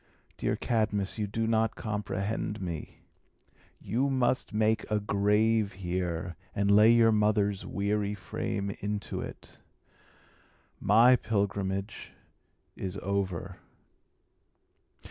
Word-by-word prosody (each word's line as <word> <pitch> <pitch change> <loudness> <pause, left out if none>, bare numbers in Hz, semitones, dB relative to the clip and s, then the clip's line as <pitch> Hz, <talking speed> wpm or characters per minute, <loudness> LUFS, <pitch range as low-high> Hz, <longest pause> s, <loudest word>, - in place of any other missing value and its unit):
Dear - - -1
Cadmus, 105 -3 -1
you 105 - -1
do 115 +3 -2
not 110 0 +1
comprehend 105 -1 -3
me. 85 -4 -6 0.8
You 130 +5 0
must 130 -1 +1
make 110 +1 +1
a 105 -1 +1
grave 105 +1 +2
here, 90 -2 -3 0.2
and 100 0 +2
lay 105 +2 +7
your 115 -1 +6
mother's 105 -2 +1
weary 100 0 -1
frame 100 +1 -3
into 105 0 -3
it. - - -10 1.2
My 115 +5 +6
pilgrimage 100 -2 -2 0.6
is 95 0 -5
over." 95 -3 -2
105 Hz, 100 wpm, -29 LUFS, 100-110 Hz, 1.2 s, lay